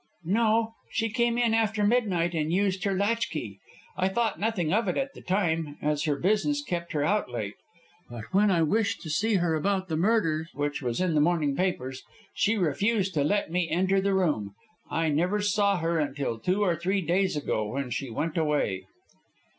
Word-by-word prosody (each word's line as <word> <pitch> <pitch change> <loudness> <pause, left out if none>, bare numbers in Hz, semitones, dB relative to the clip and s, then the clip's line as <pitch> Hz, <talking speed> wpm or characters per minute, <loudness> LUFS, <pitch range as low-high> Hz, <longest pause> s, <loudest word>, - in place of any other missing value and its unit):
"No, 225 +4 +2 0.2
she 225 -1 -1
came 235 0 +1
in 235 -2 +2
after 220 -2 +1
midnight 200 -7 +1
and 155 -1 -1
used 190 +1 +1
her 195 -1 +1
latchkey. 185 - -1 0.4
I 185 0 +1
thought 225 +3 -1
nothing 200 -7 0
of 220 +1 +2
it 180 - 0
at 275 0 -2
the - - -12
time, 165 -6 -1
as 150 0 0
her 150 -2 +1
business 215 - +1
kept 170 -9 -4
her 145 -2 0
out 205 -1 +1
late. 110 -4 -4 0.6
But 120 -2 -7
when 205 +2 +4
I 170 -4 +3
wished 210 +7 +1
to 160 - -6
see 215 +7 +1
her 175 -3 +1
about 190 +4 0
the 160 - -1
murder, 165 -4 +1
which 145 0 -2
was 120 +3 -2
in 180 -3 +1
the 150 - +3
morning 155 -3 +2
papers, 135 -8 -2 0.3
she 220 +2 +1
refused 195 +4 +1
to 145 -4 +1
let 200 +2 0
me 175 -1 0
enter 190 +3 +2
the 195 0 +1
room. 130 - 0 0.3
I 165 -1 0
never 175 +8 +1
saw 205 -1 +2
her 165 0 0
until 140 -5 -2
two 185 - +1
or 175 -4 +2
three 190 +4 0
days 185 +2 +1
ago, 110 -7 -1
when 130 +3 -4
she 135 0 -3
went 155 +9 -3
away." 145 -12 0
180 Hz, 195 wpm, -27 LUFS, 150-205 Hz, 0.6 s, when